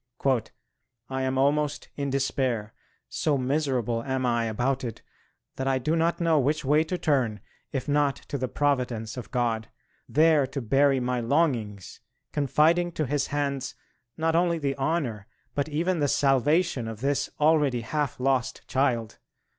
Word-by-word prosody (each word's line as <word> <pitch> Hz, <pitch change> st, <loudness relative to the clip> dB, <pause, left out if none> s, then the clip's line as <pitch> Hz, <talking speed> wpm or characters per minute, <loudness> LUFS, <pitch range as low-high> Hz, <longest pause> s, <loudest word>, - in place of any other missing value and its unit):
"I 130 Hz, 0 st, -1 dB
am 130 Hz, 0 st, 0 dB
almost 145 Hz, +2 st, +1 dB
in 140 Hz, -1 st, -2 dB
despair... 130 Hz, -5 st, -1 dB, 0.3 s
so 150 Hz, -2 st, 0 dB
miserable 130 Hz, -4 st, 0 dB
am 130 Hz, +1 st, -2 dB
I 120 Hz, -1 st, +1 dB
about 125 Hz, +5 st, -1 dB
it 115 Hz, -3 st, -6 dB, 0.5 s
that 130 Hz, -, -2 dB
I 135 Hz, -1 st, +2 dB
do 155 Hz, +6 st, 0 dB
not 165 Hz, +1 st, +1 dB
know 165 Hz, -3 st, +3 dB
which 145 Hz, +2 st, 0 dB
way 150 Hz, +3 st, +4 dB
to 180 Hz, +3 st, -2 dB
turn, 130 Hz, -10 st, +1 dB, 0.3 s
if 130 Hz, -2 st, -3 dB
not 145 Hz, -1 st, +2 dB
to 140 Hz, -, -3 dB
the 130 Hz, -, -1 dB
Providence 125 Hz, -6 st, -1 dB
of 125 Hz, -, -7 dB
God, 115 Hz, -3 st, -1 dB, 0.4 s
there 155 Hz, -2 st, +4 dB
to 140 Hz, +2 st, -4 dB
bury 135 Hz, +3 st, +3 dB
my 125 Hz, 0 st, -1 dB
longings, 115 Hz, -, -1 dB, 0.3 s
confiding 155 Hz, +5 st, +2 dB
to 155 Hz, -, -1 dB
His 145 Hz, +2 st, 0 dB
hands 140 Hz, -2 st, -2 dB, 0.4 s
not 160 Hz, 0 st, +1 dB
only 170 Hz, 0 st, +2 dB
the 140 Hz, -3 st, -1 dB
honour 135 Hz, -8 st, -2 dB, 0.3 s
but 145 Hz, +1 st, -1 dB
even 170 Hz, +4 st, 0 dB
the 145 Hz, -, +2 dB
salvation 140 Hz, 0 st, +2 dB
of 110 Hz, -1 st, -7 dB
this 140 Hz, +1 st, 0 dB
already 150 Hz, -5 st, +3 dB
half 145 Hz, +3 st, -2 dB
lost 130 Hz, -1 st, 0 dB
child. 120 Hz, -5 st, 0 dB
135 Hz, 155 wpm, -26 LUFS, 125-150 Hz, 0.5 s, way